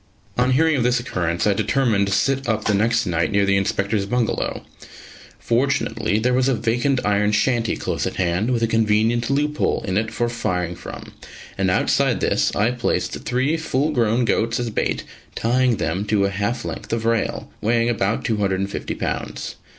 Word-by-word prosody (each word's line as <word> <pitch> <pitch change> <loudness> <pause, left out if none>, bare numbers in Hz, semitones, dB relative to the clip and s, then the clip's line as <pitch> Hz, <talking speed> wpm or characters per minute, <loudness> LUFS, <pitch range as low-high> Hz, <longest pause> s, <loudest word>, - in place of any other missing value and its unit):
On 125 +1 +2
hearing 160 +3 +3
of - - +1
this 125 +1 +2
occurrence, 85 -8 -2
I 105 - +4
determined 110 -1 +1
to - - -2
sit 135 +6 +1
up 110 -1 0
the 105 - +2
next 115 +3 +2
night 85 -3 0
near 100 0 +3
the 100 0 +2
Inspector's 100 +1 0
bungalow. 125 0 -1 0.7
Fortunately 120 -4 0
there 125 +3 +1
was 130 +1 +2
a 135 - +2
vacant 120 +4 0
iron 105 0 +2
shanty 115 +1 +1
close - - -2
at - - -5
hand, 90 +5 0
with 120 -2 +1
a - - +3
convenient 115 +1 +2
loophole 150 +2 0
in 95 0 0
it 110 0 -2
for 120 +1 -1
firing 90 -7 -2
from; - - -9 0.4
and - - 0
outside - - +2
this - - +1
I 110 +4 +2
placed 125 -1 -1
three 130 +6 +1
full 155 -2 0
grown 120 -2 +2
goats 115 0 +1
as 120 -2 -2
bait, - - -1 0.3
tying 125 0 +2
them 90 +5 -2
to 100 -2 +2
a 100 - 0
half 105 +5 -2
length - - -6
of 115 -1 -1
rail, 115 -1 -1
weighing 115 +2 +2
about 110 -2 0
250 100 -3 -1
lbs. - - -4
115 Hz, 180 wpm, -21 LUFS, 100-125 Hz, 0.7 s, I